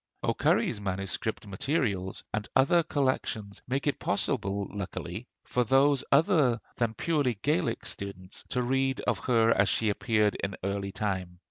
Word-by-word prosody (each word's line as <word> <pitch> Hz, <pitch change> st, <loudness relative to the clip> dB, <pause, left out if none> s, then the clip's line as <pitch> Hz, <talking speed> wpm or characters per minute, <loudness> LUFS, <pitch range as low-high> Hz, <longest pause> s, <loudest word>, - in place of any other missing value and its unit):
O'Curry's 105 Hz, -4 st, +1 dB
'MS. 95 Hz, 0 st, -2 dB, 0.3 s
Materials,' 100 Hz, -, -1 dB
and 105 Hz, -1 st, -2 dB
other 140 Hz, +6 st, +5 dB
collections 130 Hz, -9 st, -1 dB
make 135 Hz, +3 st, -1 dB
it 145 Hz, -, 0 dB
possible, 100 Hz, -2 st, 0 dB
luckily, 100 Hz, -2 st, -5 dB, 0.2 s
for 125 Hz, -, 0 dB, 0.5 s
other 145 Hz, -, +4 dB, 0.2 s
than 115 Hz, -2 st, 0 dB
purely 145 Hz, -8 st, 0 dB
Gaelic 155 Hz, +3 st, 0 dB
students 95 Hz, -2 st, -5 dB
to 125 Hz, -, 0 dB
read 135 Hz, +1 st, +1 dB
of -, -, 0 dB
her 115 Hz, -2 st, +3 dB
as 100 Hz, -3 st, +3 dB
she 110 Hz, -, +1 dB
appeared 105 Hz, 0 st, +2 dB
in 95 Hz, 0 st, -2 dB
early 100 Hz, 0 st, -2 dB
time. 95 Hz, -4 st, -3 dB
110 Hz, 135 wpm, -29 LUFS, 100-135 Hz, 0.5 s, other